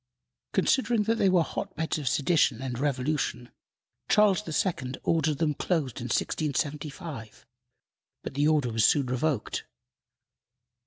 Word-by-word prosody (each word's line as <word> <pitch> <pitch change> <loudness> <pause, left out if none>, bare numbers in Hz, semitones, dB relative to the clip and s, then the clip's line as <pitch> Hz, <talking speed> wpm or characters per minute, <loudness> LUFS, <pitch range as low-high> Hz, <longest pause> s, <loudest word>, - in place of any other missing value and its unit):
Considering 240 -5 +2
that 225 +2 0
they 195 - +4
were 180 -2 +4
hot 195 +4 -5
beds 160 0 -1
of 145 - -5
sedition 140 -3 +2
and 130 -2 -4
revolution, 135 -3 -1 0.6
Charles 210 -2 +4 0.2
II. 130 -9 -3
ordered 160 -3 +1
them 160 -2 +1
closed 145 -5 -1
in 120 - -5
1675, 145 - -3 0.8
but - - -6
the 145 +2 +2
order 150 -6 +2
was 110 -1 +2
soon 140 +5 +4
revoked. 130 0 -1
150 Hz, 125 wpm, -28 LUFS, 130-165 Hz, 0.8 s, they